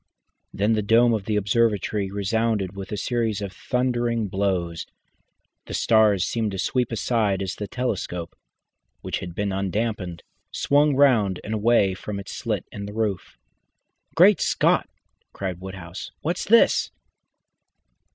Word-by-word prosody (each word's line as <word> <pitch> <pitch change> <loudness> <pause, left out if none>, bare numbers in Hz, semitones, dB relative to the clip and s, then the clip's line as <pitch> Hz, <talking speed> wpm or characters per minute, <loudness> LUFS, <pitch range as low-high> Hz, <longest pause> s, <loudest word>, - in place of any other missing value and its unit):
Then 105 +3 +1
the 110 - +1
dome 115 +3 +4
of 105 -3 -2
the 105 - -1
observatory 105 -1 +1
resounded 100 0 -1
with 100 +1 -7
a 105 - -2
series 115 -1 -1
of 100 -2 -5
thundering 120 -2 -1
blows. 90 -4 -1 0.8
The - - -4
stars 105 -4 +3
seemed 115 -2 -1
to - - -4
sweep 125 +6 0
aside 110 -4 0
as 95 - -3
the 105 - -6
telescope 95 -9 -3 0.7
which - - -3
had 85 -1 -8
been 100 -1 -1
unclamped 95 -2 -2 0.3
swung 145 0 +2
round 115 -9 +3
and 110 - -4
away 110 -3 +3
from 100 +2 -6
the 100 - -5
slit - - -3
in 100 0 -6
the 105 - -8
roof. 105 -4 -2 0.8
"Great 190 +4 +6
Scott!" - - +2 0.4
cried 90 -2 -5
Woodhouse. 95 -2 -8
"What's 170 +3 -2
this?" 230 +3 +4
105 Hz, 140 wpm, -24 LUFS, 95-115 Hz, 0.8 s, Great